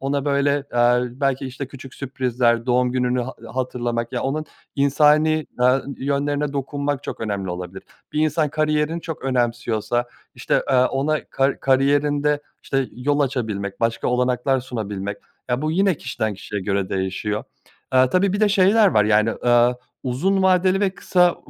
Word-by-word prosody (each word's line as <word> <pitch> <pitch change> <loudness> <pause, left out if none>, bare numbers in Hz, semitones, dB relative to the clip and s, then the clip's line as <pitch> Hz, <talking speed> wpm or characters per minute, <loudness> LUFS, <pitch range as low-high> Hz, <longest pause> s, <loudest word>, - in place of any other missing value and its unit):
ona, 140 +1 -1
böyle, 140 0 +1
aaa, 120 0 +4 0.2
belki, 135 -1 0
işte, 130 +2 -6
küçük 135 0 -11
sürprizler 125 -3 0
doğum 125 0 +2
gününü 125 0 +1
ha 130 +2 -6 0.2
hatırlamak 120 -2 -2
ya, 125 - -2
onun 150 +3 -2 0.3
insani, 150 +2 +3
aaa, 125 +2 +4 0.2
yönlerine 145 +1 -1
dokunmak 140 0 -2
çok - - -6
önemli 100 -4 -3
olabilir. 90 +1 -6 0.3
Bir 150 - 0
insan 155 0 +1
kariyerini 155 +2 0
çok 160 -1 -7
önemsiyorsa, 120 -2 0 0.3
işte, - - 0
eee, - - +3
ona 135 +4 +1
kar 135 +1 0
kariyerinde, 145 +2 +2 0.2
işte, 135 -1 -1
yol 145 +4 0
açabilmek 110 -8 -2
başka 115 0 0
olanaklar 125 +1 +1
sunabilmek 105 -5 -5 0.3
ya, 125 +3 0
bu 155 - 0
yine 190 +3 +2
kişiden 110 -6 -3
kişiye 100 +1 -5
göre 100 -1 -1
değişiyor. 95 +3 -2 0.5
Aaa, 130 0 +4
tabii 185 +1 +2
bir 205 - -1
de 215 - +4
şeyler 205 +2 +5
var, 105 - +3
yani, 110 +1 +3
aaa, 120 +1 +3 0.3
uzun 185 +10 0
vadeli 185 +1 +3
ve 200 - +2
kısa, 180 -2 +2
130 Hz, 155 wpm, -22 LUFS, 120-150 Hz, 0.5 s, şeyler